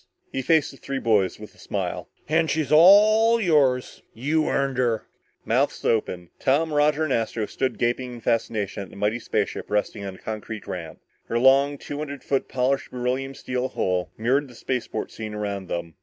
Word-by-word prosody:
He 130 - -2
faced 160 +2 +2
the 135 - -14
three 135 0 -4
boys 105 -7 +1
with - - -11
a - - -23
smile. - - -4 0.2
"And 160 +1 +2
she's 155 -2 -1
all 215 +8 +7
yours. 145 - +2
You 150 +6 0
earned 135 -2 0
her!" 120 -3 +1 0.4
Mouths - - 0
open, 90 -6 0
Tom, 150 +4 +1
Roger 150 +1 +3
and 150 -4 0
Astro 115 -1 -1
stood 130 +3 -2
gaping 125 +1 -1
in 120 - -8
fascination 110 -3 -1
at 95 - -8
the - - -14
mighty 105 +4 0
spaceship - - -2
resting 105 0 -1
on 95 -1 -5
the 95 - -14
concrete 110 -1 -6
ramp. 85 -3 -7 0.3
Her 115 - -1
long 135 +3 +4
two 145 +1 -7
hundred 145 -2 -6
foot 135 -1 0
polished 130 +1 0
beryllium 130 +2 -2
steel 125 0 -2
hull 90 -1 -1
mirrored 130 +6 +1
the 125 - -15
spaceport 125 -3 -3
scene 110 -1 -6
around 100 -2 -4
them. 85 -1 -4
125 Hz, 185 wpm, -24 LUFS, 110-145 Hz, 0.4 s, all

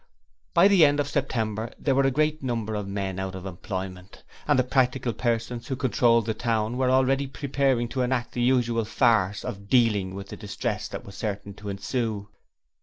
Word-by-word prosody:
By 175 +3 +7
the 195 -5 +6
end 145 -1 +4
of 145 - +1
September 115 -6 -2
there 140 - +1
were 135 0 +3
great 155 +3 0
numbers 115 -4 -2
of 100 - -5
men 100 -1 -3
out 95 -1 -4
of 95 0 -8
employment, 95 0 -6 0.2
and 145 -2 +4
the 130 - +4
practical 125 -1 +1
persons 120 +1 -2
who 135 - -2
controlled 120 -3 +3
the 110 - 0
town 115 0 -1
were 130 0 +1
already 135 +1 +3
preparing 135 -3 0
to 130 - -2
enact 125 -1 0
the 120 - -3
usual 120 -2 +2
farce 105 -4 +2
of 100 -5 -6
'Dealing' 105 -7 +3
with 100 0 -7
the - - -7
distress 105 0 -3
that - - -7
was 100 - -10
certain 100 -2 -4
to 105 +1 -8
ensue. 105 +1 -3
115 Hz, 185 wpm, -26 LUFS, 105-130 Hz, 0.2 s, By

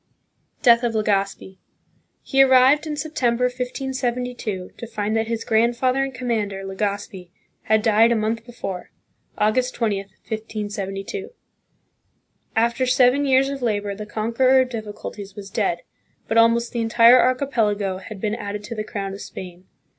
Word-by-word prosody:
Death 235 -3 +6
of 240 -2 -1
Legazpi. 195 -2 -1 0.6
He 270 - +3
arrived 270 +4 +5
in 300 -1 -4
September, 265 -6 0
1572, 250 -5 -3
to 235 - -8
find 215 -1 -2
that 225 0 0
his 230 0 -2
grandfather 240 +4 +2
and 270 - -3
commander, 220 -6 -2
Legazpi, 195 -1 -4 0.4
had 220 0 +2
died 225 +1 +4
a - - +3
month 225 +1 -1
before 230 -6 -7 0.5
(August 250 +4 +1
20, 220 -4 0 0.3
1572). 210 - -5 1.3
After 235 +3 +1
seven 255 +3 +4
years 265 0 +4
of 275 -1 -5
labor 205 -4 -1
the 210 +1 -8
conqueror 235 +5 +3
of 255 - -1
difficulties 210 -3 -7
was 200 -1 -9
dead, 175 -6 -1 0.4
but 225 - -1
almost 230 +1 +4
the 235 - -2
entire 230 +2 +6
archipelago 220 -7 0
had 195 +1 -9
been 210 +1 -1
added 205 -2 -5
to 230 - -6
the 215 -2 -3
crown 200 -2 -5
of 200 - -8
Spain. 180 0 -9
225 Hz, 145 wpm, -22 LUFS, 205-250 Hz, 1.3 s, Death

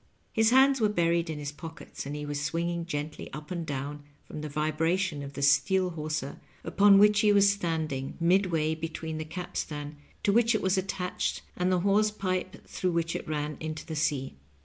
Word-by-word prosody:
His 220 0 +4
hands 265 +1 +5
were 215 - +4
buried 170 -3 +1
in 155 - -3
his 145 -1 -4
pockets, 160 -2 -9
and 145 - -4
he 150 0 -5
was 145 -1 -3
swinging 170 +3 -2
gently 150 -1 -5
up 150 +2 -8
and 175 -2 -2
down 145 +1 -4 0.2
from 155 - -7
the 150 - -5
vibration 155 +3 0
of 140 0 -7
the 140 - -4
steel 180 +6 +3
hawser 155 -3 -4 0.2
upon 200 0 +5
which 210 +1 +6
he 215 -1 +5
was 200 0 +6
standing, 160 -8 -3
midway 170 -3 +2
between 160 0 -5
the 155 - -4
capstan 155 -3 -5 0.3
to 200 - +3
which 230 0 +4
it - - 0
was 190 0 +2
attached 185 -1 -2
and 180 +1 +1
the 180 -1 +2
hawse 205 +3 +3
pipe 185 -1 -3
through 180 -2 -2
which 165 0 0
it - - -5
ran 150 -1 -2
into 155 -1 -5
the 160 - -5
sea. 145 -3 -1
165 Hz, 195 wpm, -28 LUFS, 150-190 Hz, 0.3 s, which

